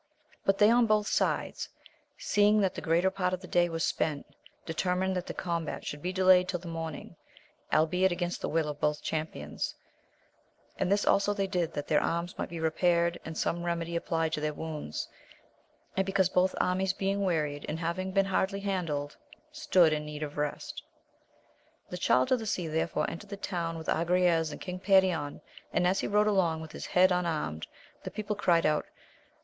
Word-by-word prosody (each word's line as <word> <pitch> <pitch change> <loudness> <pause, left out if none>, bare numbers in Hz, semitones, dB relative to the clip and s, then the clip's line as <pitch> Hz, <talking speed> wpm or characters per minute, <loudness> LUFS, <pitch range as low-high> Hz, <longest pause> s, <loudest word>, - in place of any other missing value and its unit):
UT 195 0 +4
they 210 +1 +6
on 240 -1 +4
both 215 -1 +3
sides, - - -1 0.5
seeing 210 - +3
that 190 -2 +1
the - - -6
greater 170 +3 +2
part 185 -1 0
of 180 - -14
the 180 - -9
day 175 0 +2
was 165 -1 -2
spent, 150 -3 -1 0.4
determined 180 +3 0
that 180 -1 -3
the - - -3
combat 170 -3 -3
should 145 - -5
be 180 - -2
delayed 185 -1 +5
till 180 -1 -2
the 175 - -10
mor 165 -1 -3
row, 160 +2 -10 0.6
albeit 180 +4 +3
against 175 0 -2
the - - -2
will 160 -1 +1
of 150 -1 -5
both 150 0 0
champions, 155 0 -3 1.0
and 180 - 0
this 200 0 +2
also 205 +1 +3
they 195 -1 0
did 180 -4 -1
that 145 - -3
their 150 - +3
arms 170 +1 -2
might - - -4
be 170 - -6
repaired, 170 +1 +2
and 160 0 -7
some 170 - -1
remedy 170 -1 -2
applied 165 -1 -1
to 150 - -1
their 150 0 -1
wounds, 155 - -5 0.9
and 190 - +2
be 195 - -4
cause 190 -2 +3
both 185 0 +2
armies 185 +1 +1
being 195 +1 -1
wearied, 150 -6 -1
and 155 - -2
having 170 +3 -2
been 195 0 +3
hardly 195 +1 0
handled, 165 -8 -2 0.4
stood 185 - +3
in 150 0 -1
need 150 0 -6
of 145 -1 -6
rest. 150 -1 -3 1.1
The 180 - -4
Child 130 -6 +3
of 255 - +4
the 220 - -5
Sea 180 -5 -1
therefore 155 -1 0
entered 195 +4 -7
the 200 - -6
town 170 -4 -3
with 160 - -7
Agrayes 170 -1 +2
and - - -7
King 180 -1 -6
Perion, 185 -6 +2 0.3
and 180 - +1
as 190 +2 +2
he - - -1
rode 210 +1 +3
along 185 -6 +2
with 160 -1 -8
his - - -7
head 185 +1 +4
un 180 -1 +1
armed, 80 - -3 0.4
the - - -4
people 210 0 -3
cried 175 -4 +3
out. 155 0 +1
175 Hz, 195 wpm, -30 LUFS, 160-190 Hz, 1.1 s, they